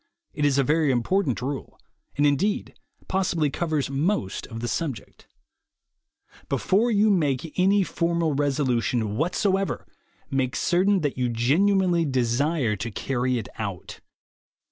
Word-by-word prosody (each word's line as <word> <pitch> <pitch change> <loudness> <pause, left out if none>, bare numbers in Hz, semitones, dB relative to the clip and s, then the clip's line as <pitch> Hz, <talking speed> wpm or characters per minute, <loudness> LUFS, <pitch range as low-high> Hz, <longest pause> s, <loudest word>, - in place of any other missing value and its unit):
It 150 - -1
is 140 -2 +3
a 140 - +4
very 150 +2 +2
important 130 - 0
rule, 135 +1 -5 0.4
and, 145 - +3
indeed, 195 - +1 0.3
possibly 170 -6 0
covers 155 -4 -1
most 140 - -1
of 115 -1 -7
the 120 - -3
subject: 135 -6 -5 1.2
Before 215 +6 +2
you 215 -1 +3
make 150 -4 0
any 195 +2 +4
formal 170 -3 0
resolution 125 -6 0
what 160 +8 -1
soever, 195 -1 0 0.5
make 135 0 0
certain 185 +5 +2
that 145 -3 -2
you 125 -1 +1
genuinely 170 - +2
desire 130 -1 +1
to 115 +5 -4
carry 125 +3 -1
it 115 - -4
out. 100 -5 -5
145 Hz, 130 wpm, -25 LUFS, 125-180 Hz, 1.2 s, a